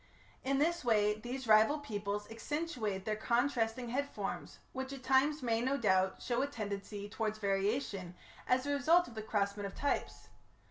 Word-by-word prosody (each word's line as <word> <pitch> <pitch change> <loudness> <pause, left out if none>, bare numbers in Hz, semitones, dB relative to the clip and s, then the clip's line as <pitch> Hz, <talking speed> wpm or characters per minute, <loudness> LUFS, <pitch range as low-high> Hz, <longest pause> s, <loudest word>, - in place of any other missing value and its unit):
In 270 +1 +1
this 335 +4 +1
way 210 -3 +3
these 250 +3 -5
rival 220 +7 +6
peoples 205 -6 -4
accentuate 225 - -3
their 215 - 0
contrasting 235 +1 0
head 280 +4 -1
forms, - - -5 0.2
which 265 0 -4
at 270 -2 -8
times 270 +3 +3
may, 230 -2 +1
no 265 +3 +1
doubt, 190 -5 +2
show 240 0 0
a 280 - +1
tendency 205 -4 -5
towards 215 0 -2
variation 195 -2 -1 0.3
as 255 +1 +2
a 285 - 0
result 325 +5 +4
of 240 - -11
the 220 - -5
crossment 205 -1 -1
of 195 - -10
types. 285 - -2
230 Hz, 170 wpm, -34 LUFS, 205-275 Hz, 0.3 s, rival